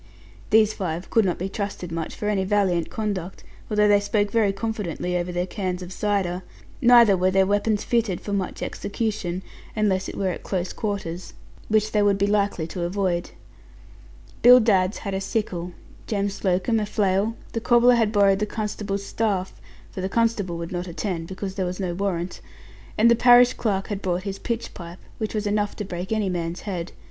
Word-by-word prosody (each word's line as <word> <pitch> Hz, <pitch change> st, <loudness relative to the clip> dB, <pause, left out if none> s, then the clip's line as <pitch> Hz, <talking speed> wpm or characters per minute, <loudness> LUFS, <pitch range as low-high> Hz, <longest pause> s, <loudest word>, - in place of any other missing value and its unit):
These 215 Hz, 0 st, +5 dB
five 175 Hz, -2 st, -4 dB
could 225 Hz, -3 st, +4 dB
not 180 Hz, -, 0 dB
be 185 Hz, -, -3 dB
trusted 195 Hz, -3 st, -5 dB
much 165 Hz, -1 st, -4 dB
for 210 Hz, -, -4 dB
any 200 Hz, -2 st, +1 dB
valiant 190 Hz, -4 st, +1 dB
conduct, 200 Hz, -5 st, -4 dB, 0.3 s
although 210 Hz, -1 st, +3 dB
they 205 Hz, -1 st, +5 dB
spoke 205 Hz, 0 st, 0 dB
very 220 Hz, -4 st, +3 dB
confidently 195 Hz, -4 st, -3 dB
over 175 Hz, 0 st, -1 dB
their 175 Hz, 0 st, -1 dB
cans 185 Hz, -2 st, -3 dB
of 180 Hz, +1 st, -8 dB
cider. 190 Hz, -4 st, -1 dB, 0.4 s
Neither 235 Hz, -5 st, +7 dB
were 185 Hz, 0 st, +2 dB
their 190 Hz, 0 st, +3 dB
weapons 205 Hz, +1 st, +1 dB
fitted 225 Hz, -7 st, 0 dB
for 205 Hz, -, -5 dB
much 195 Hz, -2 st, -2 dB
execution, 200 Hz, -4 st, -3 dB, 0.3 s
unless 195 Hz, -3 st, +1 dB
it -, -, -8 dB
were 195 Hz, -1 st, 0 dB
at 180 Hz, -, -4 dB
close 185 Hz, -2 st, -3 dB
quarters, 190 Hz, -5 st, -4 dB, 0.3 s
which 215 Hz, 0 st, +2 dB
they 210 Hz, -, +2 dB
would 200 Hz, -1 st, +3 dB
be 200 Hz, -, +2 dB
likely 200 Hz, -5 st, +1 dB
to 175 Hz, +2 st, -6 dB
avoid. 175 Hz, -1 st, -1 dB, 1.1 s
Bill 250 Hz, +1 st, +9 dB
Dadds 200 Hz, -4 st, +2 dB
had 200 Hz, -, -2 dB
a 190 Hz, -, -2 dB
sickle, 180 Hz, -5 st, -3 dB, 0.3 s
Jem 200 Hz, -2 st, 0 dB
Slocombe 195 Hz, +3 st, 0 dB
a 210 Hz, -, -2 dB
flail, 205 Hz, +2 st, +1 dB, 0.2 s
the 230 Hz, -, -3 dB
cobbler 240 Hz, +1 st, +5 dB
had 225 Hz, -3 st, +2 dB
borrowed 200 Hz, -2 st, +4 dB
the 210 Hz, -, -1 dB
constable's 205 Hz, -2 st, -3 dB
staff 195 Hz, -5 st, -2 dB, 0.3 s
(for 190 Hz, -, -6 dB
the 190 Hz, -, -2 dB
constable 220 Hz, -6 st, 0 dB
would 170 Hz, 0 st, -6 dB
not 180 Hz, 0 st, -3 dB
attend, 170 Hz, -1 st, -3 dB
because 190 Hz, +1 st, -5 dB
there 190 Hz, -1 st, -2 dB
was 180 Hz, +2 st, -5 dB
no 185 Hz, -3 st, -2 dB
warrant), 180 Hz, -1 st, -3 dB, 0.6 s
and 235 Hz, +2 st, +5 dB
the -, -, +6 dB
parish 245 Hz, +1 st, +6 dB
clerk 195 Hz, -4 st, -1 dB
had 205 Hz, -2 st, -3 dB
brought 180 Hz, -1 st, -1 dB
his 195 Hz, -1 st, -5 dB
pitch 235 Hz, 0 st, -4 dB
pipe, 170 Hz, 0 st, -9 dB, 0.2 s
which 220 Hz, 0 st, -3 dB
was 210 Hz, 0 st, -1 dB
enough 205 Hz, 0 st, 0 dB
to 210 Hz, -, -5 dB
break 180 Hz, +1 st, -6 dB
any 215 Hz, -2 st, +1 dB
man's 175 Hz, -1 st, -3 dB
head. 180 Hz, -4 st, -4 dB
200 Hz, 190 wpm, -24 LUFS, 180-215 Hz, 1.1 s, Bill